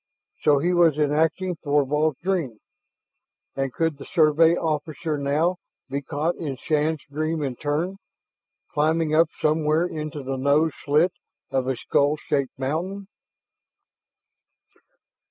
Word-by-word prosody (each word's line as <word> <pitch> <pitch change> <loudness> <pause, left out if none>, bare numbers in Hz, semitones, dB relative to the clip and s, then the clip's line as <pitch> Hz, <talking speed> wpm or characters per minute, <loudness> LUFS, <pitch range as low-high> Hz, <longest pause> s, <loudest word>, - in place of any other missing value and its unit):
So 145 -1 +4
he 175 +6 +1
was 170 -4 +4
enacting 160 +4 +1
Thorvald's 145 0 +1
dream! 170 - -1 1.0
And 135 -1 -1
could 160 0 -1
the - - -8
Survey 160 0 +4
officer 155 0 -2
now 150 +6 +1 0.3
be 140 +1 -1
caught 150 +5 -1
in 145 -5 -4
Shann's 155 +3 -1
dream 155 +2 -2
in 135 -3 -2
turn, 155 +8 -2 0.8
climbing 155 +1 +1
up 160 +1 +4
somewhere 155 +1 +2
into 155 -4 -5
the 135 0 -3
nose 145 +4 +3
slit 155 +5 +3 0.4
of 130 -1 0
a 130 - 0
skull 145 +5 +1
shaped 140 -4 -2
mountain? 175 +9 -3
155 Hz, 120 wpm, -24 LUFS, 145-165 Hz, 1.0 s, So